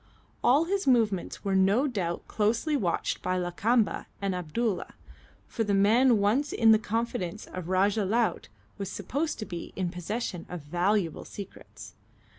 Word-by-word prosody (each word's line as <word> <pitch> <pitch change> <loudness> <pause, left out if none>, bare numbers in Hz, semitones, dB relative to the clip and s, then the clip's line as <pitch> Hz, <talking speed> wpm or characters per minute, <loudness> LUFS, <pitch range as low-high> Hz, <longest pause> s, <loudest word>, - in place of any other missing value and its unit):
All 280 +6 +5
his 390 +1 -1
movements 220 -9 +1
were 195 - 0
no 195 +8 +4
doubt 190 -11 -3
closely 230 +8 +1
watched 185 -11 -1
by 185 0 -1
Lakamba 205 +6 0
and 195 -1 -1
Abdulla, 180 +4 -2 0.5
for 225 - -2
the 205 -2 +1
man 230 +5 +5
once 225 +9 +1
in 225 -1 +5
the 220 - +6
confidence 215 -4 -3
of 180 -2 -7
Rajah 195 +3 +2
Laut 225 +4 0 0.3
was 195 -2 -3
supposed 280 - -2
to 215 - -5
be 170 -3 -7
in 180 -2 -2
possession 180 0 -4
of 180 -2 -6
valuable 175 +3 0
secrets. 200 -2 -10
205 Hz, 150 wpm, -28 LUFS, 185-235 Hz, 0.5 s, the